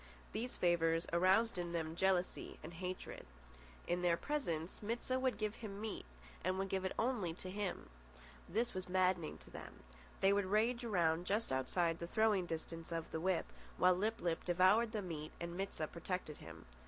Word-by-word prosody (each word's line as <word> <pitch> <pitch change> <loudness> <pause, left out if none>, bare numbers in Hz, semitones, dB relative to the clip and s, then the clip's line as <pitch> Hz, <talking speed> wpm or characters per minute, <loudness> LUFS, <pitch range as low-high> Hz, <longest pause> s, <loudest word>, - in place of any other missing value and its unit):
These 240 +3 -2
favours 165 -1 +3
aroused 190 +5 +4
in 175 -1 -3
them 160 -1 -2
jealousy 185 0 +1
and - - -7
hatred. 180 +2 -5 0.6
In 175 +1 0
their 175 -1 +3
presence 175 - -2
Mit 230 +3 -2
sah 255 0 +1
would 260 -1 +1
give 215 -1 -1
him 205 -3 -6
meat 215 -1 -4 0.4
and 185 +1 +1
would 195 0 -1
give 190 0 0
it 190 - -2
to 190 -8 0
him 200 -1 -1
only. 60 0 -19
This 230 +4 +1
was 185 -1 -4
maddening 185 -3 +2
to - - -14
them. - - -9 0.4
They 195 +1 +5
would 200 -1 +2
rage 225 +5 +2
around 175 -6 +2
just 210 -2 +1
outside 165 +6 +1
the 170 - -4
throwing 210 -2 +3
distance 165 0 -5
of 165 -1 -3
the 160 - -2
whip, 185 -1 +2 0.3
while 180 0 +6
Lip 215 +5 0
lip 170 -2 0
devoured 185 +6 +5
the 215 -3 -2
meat 155 -4 -5
and 170 0 -4
Mit 195 +2 -2
sah 155 - -2
protected 170 -1 -4
him. 85 0 -10
185 Hz, 185 wpm, -38 LUFS, 165-210 Hz, 0.6 s, while